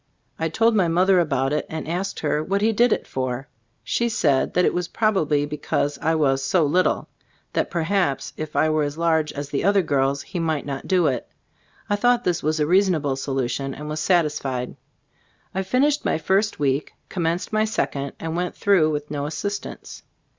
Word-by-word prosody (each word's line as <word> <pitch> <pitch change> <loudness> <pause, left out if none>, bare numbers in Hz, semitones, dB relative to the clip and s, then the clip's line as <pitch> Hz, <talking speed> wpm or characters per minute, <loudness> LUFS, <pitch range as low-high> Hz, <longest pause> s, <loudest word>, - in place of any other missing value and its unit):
I 160 - 0
told 225 +8 +3
my 190 -5 +3
mother 180 +3 +4
about 135 -4 +1
it 150 - 0
and 160 -1 -5
asked 185 +4 -3
her 150 0 0
what 200 +4 0
he 225 - +4
did 235 +2 +3
it - - 0
for? 130 +1 -3 0.4
She 235 0 0
said 145 -11 +1
that 180 - +4
it - - +2
was 175 -1 -1
probably 160 -11 +1
because 145 -1 -2
I 160 0 +1
was 135 -3 +2
"so 160 +4 +2
little." 180 +6 +1 0.5
That - - 0
per 170 -2 -1
haps 180 -5 0
if 155 -1 -6
I 155 - +3
were 155 0 +1
as 145 +1 -2
large 160 -2 +1
as 145 0 -5
the 140 - -2
other 200 0 +4
girls 140 -2 0
he 180 - -5
might 160 -3 -1
not 140 -1 -5
do 185 -2 +3
it. - - -1 0.6
I 205 -1 +1
thought 245 +2 +3
this 175 -5 0 0.2
a 150 - +2
reasonable 170 -5 +2
solution 135 0 -2
and 150 +1 -7
was 155 +1 -3
sat 175 0 +3
isfied. 130 -4 -3 0.8
I 190 - -1
finished 265 +10 +1
my - - +1
first 195 +7 +1
week, 140 0 0
commenced 170 +2 -2
my 215 0 +3
second, 140 -10 -2
and 165 0 -4
went 180 0 -2
through 190 -6 +3
with 150 -1 -3
no 145 -1 -2
assistance. 200 +6 -5
160 Hz, 195 wpm, -23 LUFS, 145-190 Hz, 0.8 s, mother